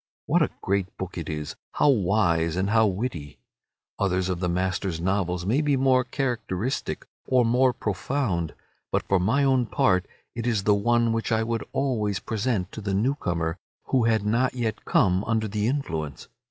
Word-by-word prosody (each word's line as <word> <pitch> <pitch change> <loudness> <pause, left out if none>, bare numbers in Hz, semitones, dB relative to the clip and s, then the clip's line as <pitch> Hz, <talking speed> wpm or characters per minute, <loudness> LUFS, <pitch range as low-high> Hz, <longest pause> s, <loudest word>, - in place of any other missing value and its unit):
What - - +2
a - - +3
great 100 -1 -1
book 95 -1 -5
it 85 -3 -5
is, 75 -1 -4 0.2
how 150 - +3
wise 90 - +2
and 95 +2 0
how 110 -1 +5
witty! 90 - -4 0.6
Others 95 -2 +1
of 90 -2 -1
the 90 -1 0
master's 90 -1 -1
novels 90 -1 -1
may 120 +10 +2
be 145 -2 +2
more 130 -1 +4
characteristic 120 -4 -2 0.2
or 125 -2 +4
more 125 +3 +4
profound, 100 - -2 0.4
but - - -1
for 95 - +3
my 115 +10 +2
own 130 -3 +3
part 90 -3 +2 0.3
it 115 0 -3
is 110 -5 +1
the 105 - +4
one 115 +2 +2
which 115 0 -2
I 110 0 +2
would 115 0 -2
always 110 -8 0
present 110 -4 -2
to 110 - -7
the 100 -1 -1
new 120 +8 +2
comer 85 - -2 0.3
who 125 -3 +3
had 110 -3 +2
not 120 +5 +1
yet 115 -4 -3
come 95 0 +3
under 110 -1 0
the 105 +1 -1
influence. 80 - -3
105 Hz, 180 wpm, -25 LUFS, 90-120 Hz, 0.6 s, how